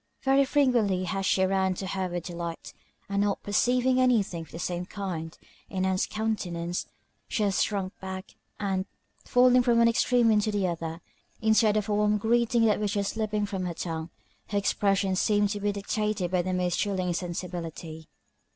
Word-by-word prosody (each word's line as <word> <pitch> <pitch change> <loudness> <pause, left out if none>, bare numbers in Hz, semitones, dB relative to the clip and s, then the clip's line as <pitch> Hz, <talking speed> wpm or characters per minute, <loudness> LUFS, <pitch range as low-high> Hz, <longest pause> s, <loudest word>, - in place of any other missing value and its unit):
Very 275 +1 +4
frequently 245 -10 +2
has 195 +1 -2
she 190 - +3
ran 190 -1 +1
to 190 - -5
her 190 0 -2
with 175 -1 -4
delight, 170 -1 -6 0.3
and 200 0 0
not 205 -1 0
perceiving 250 +5 +2
any 250 -4 +4
thing 170 -3 -6
of 160 - -11
the - - -7
same 175 +1 -3
kind 175 -6 -5 0.3
in 190 -1 -1
Ann's 190 0 +1
countenance, 180 -6 -2 0.4
she 220 - -1
has 200 -2 +1
shrunk 195 -3 -1
back; 190 0 -7 0.3
and, 195 -2 -1 0.4
falling 250 0 +5
from 240 -1 +3
one 235 0 +6
extreme 235 0 +3
into 210 0 +2
the 205 -2 0
other, 165 -1 -4 0.4
instead 220 -1 +3
of 210 -1 -1
a 210 - 0
warm 210 0 +2
greeting 235 +2 +2
that 215 -2 +3
was 205 -1 -1
just 200 -1 -1
slipping 215 -1 -1
from 195 -2 -3
her 170 - -4
tongue, 165 -1 -4 0.4
her 205 - -2
expressions 195 -1 +1
seemed 205 -1 +2
to 205 0 -3
be 205 0 0
dictated 200 -2 -2
by 180 -1 +2
the 185 +1 -3
most 180 -1 0
chilling 190 -3 0
insensibility. 170 -2 -5
200 Hz, 180 wpm, -27 LUFS, 180-215 Hz, 0.4 s, one